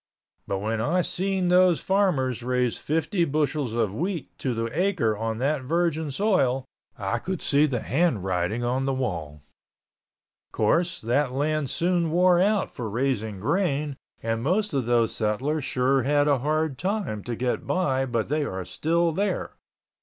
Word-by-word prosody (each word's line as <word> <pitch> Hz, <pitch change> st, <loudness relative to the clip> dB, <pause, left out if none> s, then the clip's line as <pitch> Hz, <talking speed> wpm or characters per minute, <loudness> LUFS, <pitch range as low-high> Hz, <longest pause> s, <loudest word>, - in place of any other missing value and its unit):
But 100 Hz, -, -1 dB
when 110 Hz, +3 st, -2 dB
I 175 Hz, +10 st, +1 dB
seen 190 Hz, 0 st, -1 dB
those 180 Hz, -3 st, +5 dB
farmers 160 Hz, -, +1 dB
raise 125 Hz, -1 st, 0 dB
fifty 165 Hz, +4 st, 0 dB
bushels 150 Hz, -5 st, 0 dB
of 115 Hz, -4 st, 0 dB
wheat 170 Hz, -, -3 dB
to 125 Hz, -3 st, -1 dB
the 115 Hz, 0 st, -1 dB
acre 175 Hz, -, +1 dB
on 110 Hz, +1 st, -3 dB
that 140 Hz, +3 st, 0 dB
virgin 160 Hz, +2 st, 0 dB
soil 135 Hz, -, +1 dB, 0.3 s
I 100 Hz, +2 st, -1 dB
could 185 Hz, +6 st, -4 dB
see 145 Hz, +2 st, +3 dB
the 125 Hz, -5 st, -2 dB
handwriting 105 Hz, -, 0 dB
on 130 Hz, +2 st, 0 dB
the 135 Hz, -1 st, 0 dB
wall. 80 Hz, -, -4 dB, 1.1 s
Course 170 Hz, +11 st, +1 dB
that 125 Hz, +3 st, +1 dB
land 150 Hz, 0 st, 0 dB
soon 175 Hz, +1 st, +1 dB
wore 175 Hz, +2 st, +4 dB
out 205 Hz, +1 st, +1 dB
for 115 Hz, -3 st, -4 dB
raising 110 Hz, -3 st, -1 dB
grain 145 Hz, -, 0 dB, 0.3 s
and 115 Hz, 0 st, -1 dB
most 195 Hz, -, 0 dB
of 130 Hz, -4 st, 0 dB
those 120 Hz, -2 st, +2 dB
settlers 135 Hz, +8 st, -1 dB
sure 130 Hz, +1 st, +2 dB
had 145 Hz, +3 st, +2 dB
a 140 Hz, -3 st, +3 dB
hard 155 Hz, 0 st, -1 dB
time 185 Hz, -, -2 dB
to 120 Hz, -, -3 dB
get 125 Hz, +1 st, -2 dB
by 135 Hz, -7 st, +1 dB
but 115 Hz, -3 st, -1 dB
they 150 Hz, +2 st, 0 dB
are 95 Hz, -9 st, -4 dB
still 165 Hz, -, +1 dB
there. 200 Hz, +6 st, -2 dB
140 Hz, 160 wpm, -25 LUFS, 120-170 Hz, 1.1 s, those